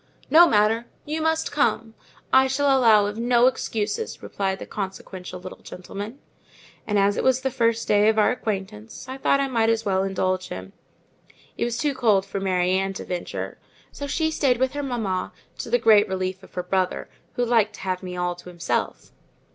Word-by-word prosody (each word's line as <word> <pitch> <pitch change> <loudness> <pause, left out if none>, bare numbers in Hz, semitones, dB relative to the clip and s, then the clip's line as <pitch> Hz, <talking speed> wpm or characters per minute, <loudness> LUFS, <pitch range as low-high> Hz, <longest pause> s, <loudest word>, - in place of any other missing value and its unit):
"No 340 +3 +8
matter—you 230 +8 0
must 320 0 0
come; 225 -6 0 0.4
I 265 0 +6
shall 270 +1 +2
allow 225 -5 +5
of 205 +2 -4
no 240 0 +4
excuses," 255 - -1
replied 190 -1 -2
the - - -8
consequential 190 -2 -6
little 185 +1 -9
gentleman. 200 +6 -8 0.7
And, 210 - +1
as 200 0 +3
it - - 0
was 260 0 +3
the 265 0 -1
first 230 -1 0
day 210 +1 +4
of 220 - +1
our 215 - +4
acquaintance, 215 -1 -5
I 260 +1 -7
thought 275 - +2
I 275 - +1
might 230 -4 +1
as 225 0 0
well 190 -2 +1
indulge 185 -1 -1
him. 95 +1 -8 0.8
It - - -1
was 235 0 -2
too 290 +3 0
cold 215 -7 +2
for 195 0 -4
Mary 185 -2 +1
Ann 195 +1 0
to - - -7
venture, 180 -1 -5 0.3
so 285 - -6
she 315 +3 0
stayed 270 -5 +2
with 260 +2 0
her 290 - -3
mamma, 220 -9 -2 0.3
to - - -5
the 240 - +4
great 220 -3 +5
relief 185 0 -3
of 190 - -17
her 180 - -2
brother, 185 0 -1 0.3
who 245 - +1
liked 225 -3 +2
to - - -12
have 185 -1 -2
me 180 -1 -6
all 180 0 -1
to 180 - -11
himself. 175 -2 -3
215 Hz, 195 wpm, -24 LUFS, 190-250 Hz, 0.8 s, No